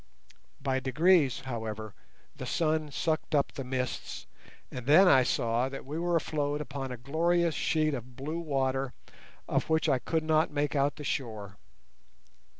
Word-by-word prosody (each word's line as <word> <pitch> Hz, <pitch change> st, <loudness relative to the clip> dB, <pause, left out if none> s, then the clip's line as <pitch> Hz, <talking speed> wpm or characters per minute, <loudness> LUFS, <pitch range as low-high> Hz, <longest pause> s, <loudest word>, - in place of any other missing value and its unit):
By 135 Hz, -1 st, 0 dB
degrees, 145 Hz, +1 st, +3 dB
however, 110 Hz, -4 st, -5 dB, 0.4 s
the -, -, -6 dB
sun 155 Hz, -2 st, 0 dB
sucked 155 Hz, +2 st, -1 dB
up 140 Hz, -, +2 dB
the 135 Hz, -, -6 dB
mists, 130 Hz, -1 st, -4 dB, 0.5 s
and 125 Hz, -1 st, -7 dB
then 175 Hz, +7 st, +7 dB
I 130 Hz, -7 st, +7 dB
saw 120 Hz, 0 st, +1 dB
that 135 Hz, -, -8 dB
we 150 Hz, +4 st, -4 dB
were 175 Hz, 0 st, +1 dB
afloat 145 Hz, -2 st, -1 dB
upon 135 Hz, -2 st, -5 dB
a 125 Hz, -, -5 dB
glorious 165 Hz, +6 st, +1 dB
sheet 155 Hz, -1 st, +1 dB
of 125 Hz, -1 st, -6 dB
blue 155 Hz, +6 st, -4 dB
water 135 Hz, -4 st, -1 dB, 0.5 s
of -, -, 0 dB
which 160 Hz, +1 st, +2 dB
I 135 Hz, -4 st, +3 dB
could 160 Hz, +4 st, -1 dB
not 155 Hz, 0 st, +3 dB
make 145 Hz, 0 st, -1 dB
out 140 Hz, 0 st, +2 dB
the 150 Hz, -, -8 dB
shore. 110 Hz, -8 st, -4 dB
140 Hz, 155 wpm, -30 LUFS, 130-155 Hz, 0.5 s, then